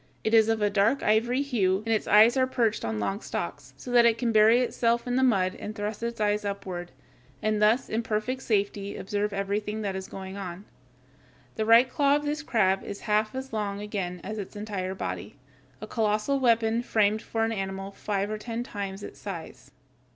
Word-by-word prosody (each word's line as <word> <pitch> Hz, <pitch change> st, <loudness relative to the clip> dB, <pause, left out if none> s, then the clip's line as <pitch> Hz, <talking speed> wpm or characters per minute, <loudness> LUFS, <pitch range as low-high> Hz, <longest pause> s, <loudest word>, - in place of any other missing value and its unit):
It 220 Hz, -, 0 dB
is 220 Hz, -1 st, +6 dB
of 225 Hz, -1 st, +1 dB
a 205 Hz, -, +3 dB
dark 215 Hz, +7 st, +2 dB
ivory 240 Hz, +5 st, +2 dB
hue, 200 Hz, -8 st, +1 dB
and -, -, -4 dB
its 215 Hz, -, -1 dB
eyes 220 Hz, +4 st, +6 dB
are 260 Hz, -1 st, +3 dB
perched 230 Hz, -4 st, 0 dB
on 110 Hz, -1 st, -2 dB
long 195 Hz, -, -2 dB
stalks, -, -, -5 dB
so 250 Hz, -, -8 dB
that 240 Hz, -1 st, +6 dB
it 230 Hz, -1 st, +4 dB
can 235 Hz, 0 st, 0 dB
bury 220 Hz, +3 st, +6 dB
itself 235 Hz, -1 st, +1 dB
in 245 Hz, 0 st, -1 dB
the 260 Hz, -, +3 dB
mud 195 Hz, -8 st, +3 dB
and 215 Hz, -, -7 dB
thrust 210 Hz, 0 st, -4 dB
its 235 Hz, 0 st, -4 dB
eyes 210 Hz, 0 st, +1 dB
upward, 190 Hz, -3 st, -5 dB, 0.5 s
and 215 Hz, -1 st, 0 dB
thus 220 Hz, +5 st, +3 dB
in 225 Hz, -, -1 dB
perfect 230 Hz, +4 st, -2 dB
safety 200 Hz, -3 st, -1 dB
observe 205 Hz, +1 st, -2 dB
everything 205 Hz, +2 st, -2 dB
that 195 Hz, -2 st, -2 dB
is 190 Hz, 0 st, -5 dB
going 190 Hz, 0 st, -8 dB
on. 190 Hz, 0 st, -7 dB, 0.9 s
The 220 Hz, 0 st, -2 dB
right 230 Hz, +3 st, +7 dB
claw 280 Hz, +2 st, +2 dB
of 295 Hz, 0 st, -1 dB
this 300 Hz, +1 st, -2 dB
crab 195 Hz, -9 st, +1 dB
is 200 Hz, -, -7 dB
half 215 Hz, +3 st, 0 dB
as 265 Hz, -1 st, -6 dB
long 205 Hz, -2 st, -2 dB
again 190 Hz, -4 st, -4 dB
as 215 Hz, +2 st, -5 dB
its 200 Hz, +1 st, -7 dB
entire 200 Hz, -3 st, -4 dB
body 90 Hz, -, -5 dB, 0.5 s
a -, -, -5 dB
colossal 215 Hz, +5 st, 0 dB
weapon 230 Hz, -2 st, +2 dB
framed 215 Hz, -2 st, +1 dB
for 225 Hz, -1 st, -1 dB
an 225 Hz, -, -1 dB
animal 195 Hz, -1 st, -4 dB
five 200 Hz, 0 st, -2 dB
or 215 Hz, -, -3 dB
ten 230 Hz, +1 st, -4 dB
times 200 Hz, -4 st, -6 dB
its -, -, -9 dB
size. 170 Hz, -8 st, -8 dB
215 Hz, 200 wpm, -27 LUFS, 200-230 Hz, 0.9 s, right